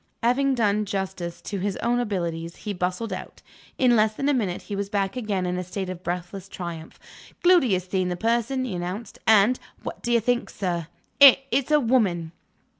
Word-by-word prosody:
Having 265 Hz, +3 st, +2 dB
done 210 Hz, -2 st, +1 dB
justice 190 Hz, -4 st, -4 dB
to 200 Hz, -, -4 dB
his 200 Hz, +1 st, -2 dB
own 240 Hz, +1 st, 0 dB
abilities, 170 Hz, -7 st, -3 dB
he 210 Hz, -, -2 dB
bustled 185 Hz, +4 st, -2 dB
out. 185 Hz, -, -8 dB, 0.3 s
In 250 Hz, -2 st, +4 dB
less 215 Hz, -1 st, +3 dB
than 275 Hz, -, -2 dB
a -, -, +3 dB
minute, 200 Hz, -9 st, -1 dB
he 205 Hz, -, -5 dB
was 200 Hz, 0 st, -3 dB
back 200 Hz, 0 st, -1 dB
again 210 Hz, -7 st, -2 dB
in 180 Hz, 0 st, -1 dB
a -, -, -3 dB
state 185 Hz, +1 st, -4 dB
of 180 Hz, -1 st, -8 dB
breathless 180 Hz, +2 st, -5 dB
triumph. 170 Hz, -4 st, -7 dB, 0.4 s
"Gloody 350 Hz, -, +5 dB
has 185 Hz, -1 st, 0 dB
seen 185 Hz, 0 st, -1 dB
the 175 Hz, -, -3 dB
person," 235 Hz, +5 st, 0 dB
he 235 Hz, -, -4 dB
announced; 180 Hz, +6 st, -5 dB
"and 220 Hz, +3 st, +5 dB, 0.2 s
(what -, -, -6 dB
do 240 Hz, -, -2 dB
you 235 Hz, -, +5 dB
think, 245 Hz, +2 st, 0 dB
sir?) 175 Hz, -5 st, -3 dB, 0.3 s
it's 270 Hz, -1 st, +6 dB
a 300 Hz, 0 st, +5 dB
woman!" 205 Hz, -, +1 dB
200 Hz, 190 wpm, -25 LUFS, 180-240 Hz, 0.4 s, it's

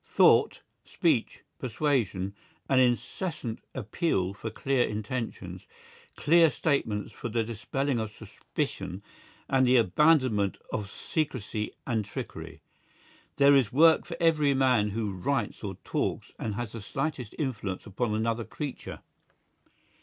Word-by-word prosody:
Thought, -, -, +4 dB, 0.2 s
speech, -, -, 0 dB, 0.2 s
persuasion, 115 Hz, -7 st, 0 dB, 0.3 s
an 135 Hz, -2 st, +4 dB
incessant 125 Hz, -, 0 dB, 0.2 s
appeal 110 Hz, -, 0 dB
for 110 Hz, +2 st, -5 dB
clear 130 Hz, +3 st, +1 dB
intentions, 110 Hz, +3 st, -5 dB, 0.5 s
clear 165 Hz, +1 st, +5 dB
statements 115 Hz, -11 st, -1 dB
for 120 Hz, -, -5 dB
the 115 Hz, +1 st, 0 dB
dispelling 120 Hz, +4 st, -2 dB
of 110 Hz, -1 st, -2 dB
suspicion 100 Hz, -2 st, -5 dB, 0.4 s
and 130 Hz, -1 st, +3 dB
the 125 Hz, +1 st, +6 dB
abandonment 120 Hz, -, +3 dB, 0.2 s
of 100 Hz, -2 st, -2 dB
secrecy 115 Hz, -7 st, -3 dB
and 115 Hz, -4 st, 0 dB
trickery; 100 Hz, -, -7 dB, 0.7 s
there 140 Hz, 0 st, +6 dB
is 130 Hz, -5 st, +3 dB
work 160 Hz, +4 st, +5 dB
for 170 Hz, -, -6 dB
every 155 Hz, -4 st, +3 dB
man 125 Hz, -6 st, +3 dB
who 105 Hz, -1 st, -2 dB
writes 105 Hz, +10 st, -2 dB
or 95 Hz, -2 st, -4 dB
talks -, -, -2 dB
and 105 Hz, -2 st, -3 dB
has 120 Hz, -1 st, -4 dB
the 115 Hz, -, -7 dB
slightest 125 Hz, +1 st, -3 dB
influence 105 Hz, -10 st, -3 dB
upon 110 Hz, +1 st, -1 dB
another 115 Hz, +1 st, 0 dB
creature. 145 Hz, +3 st, -6 dB
120 Hz, 125 wpm, -28 LUFS, 105-140 Hz, 0.7 s, the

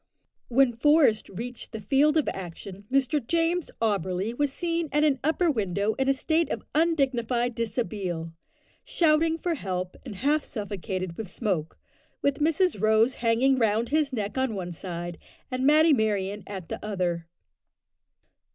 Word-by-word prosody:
When 250 Hz, 0 st, +3 dB
Forest 275 Hz, -3 st, +3 dB
reached 235 Hz, +5 st, -6 dB
the 220 Hz, -, -4 dB
field 275 Hz, +9 st, +3 dB
of 310 Hz, -, +2 dB
action, 190 Hz, +2 st, -8 dB
Mr 275 Hz, +1 st, +2 dB
James 335 Hz, +5 st, 0 dB
Auberly 200 Hz, 0 st, -1 dB
was 290 Hz, +1 st, +1 dB
seen 335 Hz, +1 st, -2 dB
at 295 Hz, +2 st, +2 dB
an 285 Hz, -3 st, +3 dB
upper 325 Hz, +3 st, +2 dB
window 205 Hz, -3 st, 0 dB
in 265 Hz, +3 st, 0 dB
a -, -, +5 dB
state 320 Hz, +5 st, +1 dB
of -, -, -3 dB
undignified 260 Hz, -7 st, +1 dB
dishabille, 205 Hz, -8 st, -3 dB, 0.5 s
shouting 325 Hz, 0 st, +2 dB
for 345 Hz, +1 st, -1 dB
help, 185 Hz, -, -4 dB
and -, -, -8 dB
half 290 Hz, +8 st, +1 dB
suffocated 190 Hz, -4 st, -4 dB
with 220 Hz, -5 st, -5 dB
smoke, 180 Hz, -7 st, -2 dB, 0.5 s
with 280 Hz, +1 st, +1 dB
Mrs 320 Hz, -, +1 dB
Rose 220 Hz, +3 st, +4 dB
hanging 250 Hz, +3 st, +3 dB
round 225 Hz, +1 st, +1 dB
his 300 Hz, -1 st, +1 dB
neck 215 Hz, 0 st, -3 dB
on 260 Hz, -4 st, 0 dB
one 180 Hz, -2 st, -4 dB
side 175 Hz, 0 st, -6 dB, 0.3 s
and 255 Hz, +1 st, 0 dB
Matty 310 Hz, +1 st, +6 dB
Merryon 205 Hz, -4 st, 0 dB
at 190 Hz, -5 st, -7 dB
the -, -, -5 dB
other. 180 Hz, -5 st, -2 dB
235 Hz, 150 wpm, -27 LUFS, 200-295 Hz, 0.5 s, Matty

